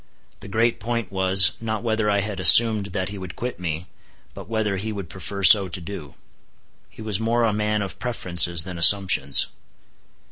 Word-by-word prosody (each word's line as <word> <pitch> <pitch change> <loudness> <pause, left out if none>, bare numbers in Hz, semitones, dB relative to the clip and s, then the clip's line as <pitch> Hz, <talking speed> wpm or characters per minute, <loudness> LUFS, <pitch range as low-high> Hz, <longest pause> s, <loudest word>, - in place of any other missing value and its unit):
The - - -12
great 115 +3 -2
point 115 -3 -6
was, 95 0 +3
not 110 -1 -6
whether 110 -2 -2
I 100 -1 -1
had 100 -2 -7
assumed 105 +3 +6
that 95 0 -6
he 100 0 -10
would 95 -2 -10
quit 125 -4 -8
me, 85 -1 -6 0.5
but - - -13
whether 110 -3 -3
he 110 +4 -6
would 100 -5 -9
prefer 95 +2 -9
so 100 0 +6
to 90 - -8
do. 85 -5 -11 0.7
He 110 - -14
was 105 -2 -2
more 115 +1 -2
a 110 -2 -1
man 105 0 -3
of 95 - -10
preferences 85 -8 +1
than 90 -1 -9
assumptions. 90 -7 +4
100 Hz, 180 wpm, -20 LUFS, 95-110 Hz, 0.7 s, assumed